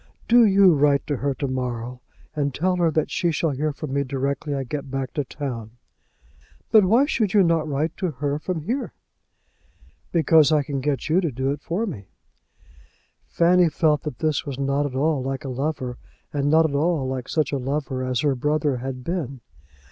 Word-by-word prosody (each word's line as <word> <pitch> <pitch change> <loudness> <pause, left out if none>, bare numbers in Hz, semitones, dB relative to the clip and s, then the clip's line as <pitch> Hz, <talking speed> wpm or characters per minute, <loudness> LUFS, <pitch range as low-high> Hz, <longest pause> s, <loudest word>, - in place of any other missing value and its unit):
Do 240 0 +6
you 195 -2 +6
write 145 -1 +2
to 145 -1 -2
her 140 0 -1
to 140 - -3
morrow, 125 -1 -4 0.3
and 145 -3 -1
tell 180 +3 +1
her 170 -2 +3
that 155 0 -1
she 175 - +1
shall 160 0 0
hear 150 +3 -1
from 145 -1 -6
me 140 0 +1
directly 140 +2 -2
I 135 - -2
get 140 +2 -5
back 135 -1 -4
to 145 - -1
town." 120 -5 -6 0.9
"But 215 -3 +7
why 230 +9 +4
should 215 -9 0
you 200 - +6
not 165 -2 +1
write 150 +3 -1
to 185 - -1
her 145 0 -2
from 170 0 -3
here?" 245 - -3 1.2
"Because 160 -2 +4
I 150 -2 +3
can 140 -1 -3
get 140 0 -1
you 165 +4 +3
to 170 - 0
do 130 +2 -1
it 145 0 -4
for 190 +7 -2
me." 105 - -7 1.2
Fanny 175 0 +4
felt 150 -1 +2
that 150 -6 -6
this 155 0 0
was 140 -3 -6
not 140 +1 0
at 130 - -8
all 145 +1 +1
like 135 +3 -4
a - - -3
lover, 130 -1 -3 0.3
and 145 0 0
not 160 +1 +5
at 145 - -6
all 150 -1 +1
like 130 -1 -4
such 155 -4 0
a 140 - -1
lover 135 0 -2
as 130 -1 -1
her 145 -2 +2
brother 145 +1 0
had 130 0 -6
been. 140 -6 -4
145 Hz, 200 wpm, -23 LUFS, 135-160 Hz, 1.2 s, But